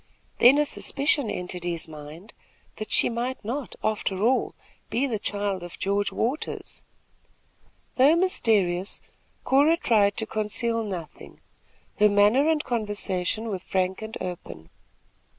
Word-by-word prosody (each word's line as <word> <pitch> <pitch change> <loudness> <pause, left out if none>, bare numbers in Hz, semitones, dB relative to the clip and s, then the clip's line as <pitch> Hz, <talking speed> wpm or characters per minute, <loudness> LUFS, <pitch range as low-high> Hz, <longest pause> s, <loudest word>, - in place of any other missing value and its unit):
Then 255 +4 +7
a 295 - +3
suspicion 280 -3 +1
entered 180 -1 -5
his 170 -2 -3
mind, 155 +6 -11 0.4
that 215 - -6
she - - +4
might 240 0 -3
not 255 +4 -4
after 210 -3 -1
all 255 +3 +2 0.3
be 245 +5 +1
the 230 -6 -2
child 200 -2 -2
of 175 0 -9
George 200 +1 0
Waters. 255 +7 -3 1.1
Though 275 +5 +6
mysterious, 205 - +1 0.4
Cora 290 +5 +4
tried 210 - +2
to 220 - -1
conceal 225 +2 -1
nothing; 180 -7 -8 0.6
her 210 - +6
manner 210 +9 +4
and 315 -1 +1
conversation 210 -2 -1
were 195 -3 -3
frank 185 +1 -1
and 220 +1 -6
open. 170 - -7
215 Hz, 130 wpm, -26 LUFS, 185-250 Hz, 1.1 s, Then